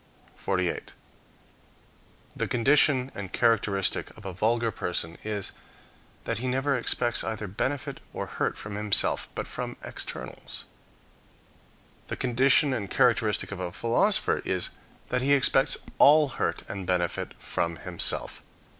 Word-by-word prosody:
48. 90 Hz, -2 st, -2 dB, 1.4 s
The -, -, -1 dB
condition 135 Hz, +1 st, +3 dB
and 100 Hz, -2 st, -6 dB
characteristic 105 Hz, -4 st, +1 dB
of 110 Hz, -, -13 dB
a 95 Hz, -, -4 dB
vulgar 115 Hz, +4 st, +1 dB
person, 85 Hz, -4 st, -2 dB
is, 105 Hz, -2 st, -1 dB, 0.7 s
that -, -, -2 dB
he 130 Hz, -, -3 dB
never 135 Hz, +3 st, +1 dB
expects 120 Hz, 0 st, +1 dB
either 110 Hz, -1 st, -3 dB
benefit 130 Hz, +8 st, -3 dB
or -, -, -4 dB
hurt -, -, -2 dB
from 105 Hz, -, -7 dB
himself, 105 Hz, 0 st, +2 dB
but -, -, -3 dB
from -, -, -5 dB
externals. -, -, -6 dB, 1.4 s
The -, -, -3 dB
condition 135 Hz, +3 st, +3 dB
and 105 Hz, -6 st, -3 dB
characteristic 115 Hz, -5 st, +2 dB
of 100 Hz, -, -5 dB
a 90 Hz, -1 st, -3 dB
philosopher 120 Hz, -, +2 dB
is, 95 Hz, -1 st, -2 dB, 0.4 s
that 125 Hz, 0 st, 0 dB
he 140 Hz, +2 st, +3 dB
expects 135 Hz, 0 st, +4 dB, 0.2 s
all 150 Hz, 0 st, +7 dB
hurt -, -, -2 dB
and 95 Hz, -2 st, -6 dB
benefit 90 Hz, -2 st, -1 dB
from 85 Hz, 0 st, -2 dB
himself. -, -, -1 dB
115 Hz, 130 wpm, -27 LUFS, 100-130 Hz, 1.4 s, all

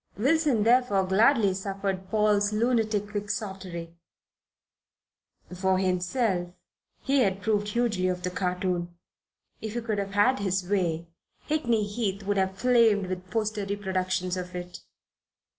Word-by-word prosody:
Wilson, 275 Hz, -1 st, +2 dB
therefore, 230 Hz, -4 st, +3 dB
gladly 205 Hz, +1 st, +4 dB
suffered 195 Hz, -1 st, -3 dB
Paul's 210 Hz, -1 st, +2 dB
lunatic 220 Hz, -2 st, +1 dB
Quixotry. 190 Hz, -5 st, -5 dB, 1.6 s
For 190 Hz, +1 st, +1 dB
himself 185 Hz, +1 st, 0 dB, 0.5 s
he 275 Hz, -1 st, +3 dB
approved 205 Hz, +1 st, 0 dB
hugely 210 Hz, -4 st, 0 dB
of 180 Hz, -1 st, -2 dB
the 180 Hz, -, -2 dB
cartoon. 180 Hz, -1 st, -2 dB, 0.7 s
If 220 Hz, 0 st, -5 dB
he 240 Hz, -, -1 dB
could 220 Hz, -3 st, -2 dB
have 200 Hz, 0 st, -4 dB
had 250 Hz, +6 st, +4 dB
his 190 Hz, -2 st, -1 dB
way, 170 Hz, -4 st, 0 dB, 0.4 s
Hickney 240 Hz, -8 st, +1 dB
Heath 200 Hz, -2 st, -2 dB
would 200 Hz, 0 st, -1 dB
have 190 Hz, 0 st, 0 dB
flamed 225 Hz, -5 st, +3 dB
with 185 Hz, 0 st, -5 dB
poster 215 Hz, -1 st, -1 dB
reproductions 185 Hz, -2 st, -2 dB
of 180 Hz, 0 st, -6 dB
it. 180 Hz, 0 st, -6 dB
200 Hz, 125 wpm, -27 LUFS, 185-220 Hz, 1.6 s, gladly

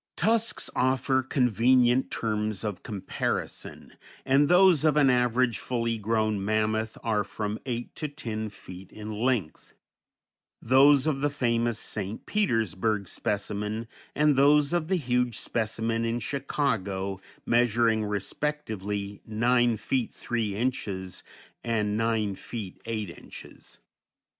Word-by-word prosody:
Tusks 225 Hz, +1 st, +1 dB
offer 130 Hz, +1 st, +2 dB
convenient 125 Hz, 0 st, +3 dB
terms 105 Hz, -2 st, -2 dB
of 105 Hz, -4 st, -3 dB
comparison, 105 Hz, -5 st, -4 dB, 0.3 s
and 140 Hz, +2 st, +4 dB
those 180 Hz, -4 st, +6 dB
of 155 Hz, -2 st, +3 dB
an 140 Hz, -3 st, +5 dB
average 125 Hz, -2 st, +2 dB
fully 115 Hz, -2 st, -1 dB
grown 110 Hz, -1 st, 0 dB
mammoth 110 Hz, +1 st, 0 dB
are 110 Hz, -3 st, +1 dB
from 105 Hz, +1 st, -4 dB
eight 120 Hz, -1 st, -4 dB
to 155 Hz, -, -2 dB
ten 110 Hz, -7 st, -5 dB
feet 95 Hz, -2 st, -12 dB
in 110 Hz, 0 st, -7 dB
length; 110 Hz, -6 st, -2 dB, 0.8 s
those 135 Hz, +3 st, +5 dB
of 145 Hz, -3 st, 0 dB
the 145 Hz, -, +2 dB
famous 120 Hz, -4 st, 0 dB
St. 105 Hz, -1 st, -4 dB
Petersburg 110 Hz, -, 0 dB
specimen 105 Hz, +3 st, -3 dB, 0.3 s
and 150 Hz, -1 st, +4 dB
those 145 Hz, +3 st, +4 dB
of 170 Hz, -2 st, 0 dB
the 190 Hz, -, +2 dB
huge 125 Hz, -, 0 dB
specimen 115 Hz, 0 st, -1 dB
in 115 Hz, +1 st, -1 dB
Chicago 100 Hz, -8 st, -2 dB, 0.2 s
measuring 115 Hz, -2 st, +3 dB
respectively 105 Hz, -2 st, -3 dB
nine 120 Hz, +1 st, +2 dB
feet 120 Hz, +3 st, -1 dB
three 110 Hz, -4 st, -2 dB
inches, 100 Hz, -6 st, -2 dB, 0.4 s
and 105 Hz, -3 st, 0 dB
nine 110 Hz, -2 st, 0 dB
feet 100 Hz, -1 st, -7 dB
eight 110 Hz, -5 st, -3 dB
inches. 85 Hz, -, -10 dB
115 Hz, 120 wpm, -27 LUFS, 105-130 Hz, 0.8 s, those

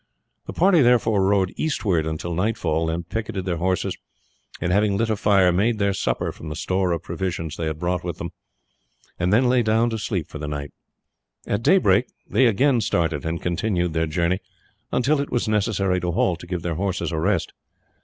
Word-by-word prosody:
The -, -, -5 dB
party 180 Hz, -2 st, +4 dB
therefore 120 Hz, -5 st, +3 dB
rode 95 Hz, -1 st, +2 dB
eastward 95 Hz, -, 0 dB
until 80 Hz, +2 st, -3 dB
nightfall, 85 Hz, -4 st, 0 dB
then 80 Hz, +1 st, -2 dB
picketed 100 Hz, 0 st, -4 dB
their 90 Hz, -3 st, -1 dB
horses, 90 Hz, +2 st, -1 dB, 0.6 s
and 85 Hz, -, -1 dB
having 100 Hz, +1 st, +2 dB
lit 115 Hz, +1 st, 0 dB
a -, -, +2 dB
fire, 100 Hz, -3 st, +4 dB
made 110 Hz, +6 st, +1 dB
their 100 Hz, -1 st, +1 dB
supper -, -, -1 dB
from 80 Hz, -, -9 dB
the 75 Hz, -, -5 dB
store 95 Hz, +2 st, 0 dB
of 85 Hz, -1 st, -2 dB
provisions 85 Hz, -2 st, -4 dB
they 80 Hz, -, -3 dB
had 80 Hz, -1 st, -3 dB
brought 90 Hz, +1 st, -1 dB
with 85 Hz, -3 st, -4 dB
them, 85 Hz, 0 st, -5 dB, 0.9 s
and 90 Hz, +1 st, +1 dB
then 120 Hz, +5 st, +4 dB
lay 125 Hz, 0 st, +3 dB
down 115 Hz, +1 st, +2 dB
to 110 Hz, -, -3 dB
sleep 100 Hz, -6 st, -2 dB
for 75 Hz, -, -9 dB
the 75 Hz, -, -4 dB
night. 75 Hz, -1 st, -5 dB, 0.7 s
At 105 Hz, -, -1 dB
daybreak 120 Hz, -, +4 dB, 0.2 s
they 125 Hz, +4 st, +3 dB
again 120 Hz, +3 st, +3 dB
started 80 Hz, -6 st, 0 dB
and 80 Hz, +1 st, -2 dB
continued 90 Hz, -1 st, 0 dB
their 80 Hz, 0 st, 0 dB
journey 85 Hz, +3 st, 0 dB, 0.5 s
until 140 Hz, +4 st, +2 dB
it 140 Hz, -, -4 dB
was 120 Hz, -1 st, 0 dB
necessary 100 Hz, -3 st, +1 dB
to 90 Hz, -, -1 dB
halt 85 Hz, 0 st, +1 dB
to 90 Hz, -, -11 dB
give 90 Hz, -2 st, -4 dB
their 85 Hz, -, -1 dB
horses 95 Hz, +2 st, -2 dB
a 80 Hz, -, -1 dB
rest. 95 Hz, +1 st, 0 dB
95 Hz, 195 wpm, -23 LUFS, 85-110 Hz, 0.9 s, party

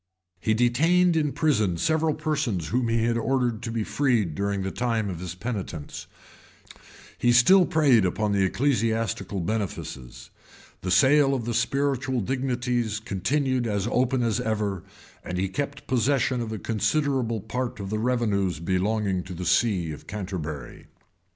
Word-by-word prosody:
He 110 Hz, +3 st, +1 dB
detained 165 Hz, +10 st, +3 dB
in 150 Hz, -3 st, +1 dB
prison 105 Hz, -, +1 dB
several 160 Hz, -, +1 dB
persons 140 Hz, -, -2 dB
whom 125 Hz, 0 st, 0 dB
he 115 Hz, 0 st, +1 dB
had 115 Hz, 0 st, +1 dB
ordered 125 Hz, -3 st, 0 dB
to 120 Hz, -, -5 dB
be 115 Hz, -1 st, -1 dB
freed 115 Hz, -, +1 dB
during 100 Hz, +3 st, -2 dB
the 95 Hz, -, -3 dB
time 115 Hz, -4 st, -1 dB
of 85 Hz, -, -6 dB
his 90 Hz, -1 st, -6 dB
penitence; 95 Hz, -7 st, -5 dB, 1.1 s
he 120 Hz, -, +3 dB
still 170 Hz, +10 st, +6 dB
preyed 140 Hz, -9 st, +4 dB
upon 105 Hz, +3 st, 0 dB
the 100 Hz, -1 st, +2 dB
ecclesiastical 110 Hz, -4 st, 0 dB
benefices; 95 Hz, -, -5 dB, 0.5 s
the 90 Hz, -, -4 dB
sale 135 Hz, +9 st, +5 dB
of 120 Hz, -2 st, -3 dB
spiritual 135 Hz, +1 st, 0 dB
dignities 120 Hz, -2 st, -1 dB
continued 125 Hz, +5 st, -1 dB
as 100 Hz, -2 st, -1 dB
open 125 Hz, 0 st, +1 dB
as 115 Hz, 0 st, 0 dB
ever; 105 Hz, -5 st, -1 dB, 0.4 s
and 90 Hz, -, -4 dB
he 95 Hz, +2 st, 0 dB
kept 140 Hz, +8 st, -4 dB
possession 130 Hz, 0 st, +1 dB
of 115 Hz, -1 st, -4 dB
a 110 Hz, -, -3 dB
considerable 120 Hz, +2 st, 0 dB
part 120 Hz, +3 st, -4 dB
of 100 Hz, 0 st, -5 dB
the 110 Hz, -, -1 dB
revenues 105 Hz, -8 st, 0 dB
belonging 95 Hz, +2 st, 0 dB
to 90 Hz, 0 st, -8 dB
the 90 Hz, +1 st, -5 dB
see 90 Hz, -2 st, +2 dB
of 75 Hz, -, -10 dB
Canterbury. 90 Hz, -9 st, -6 dB
115 Hz, 150 wpm, -25 LUFS, 95-130 Hz, 1.1 s, still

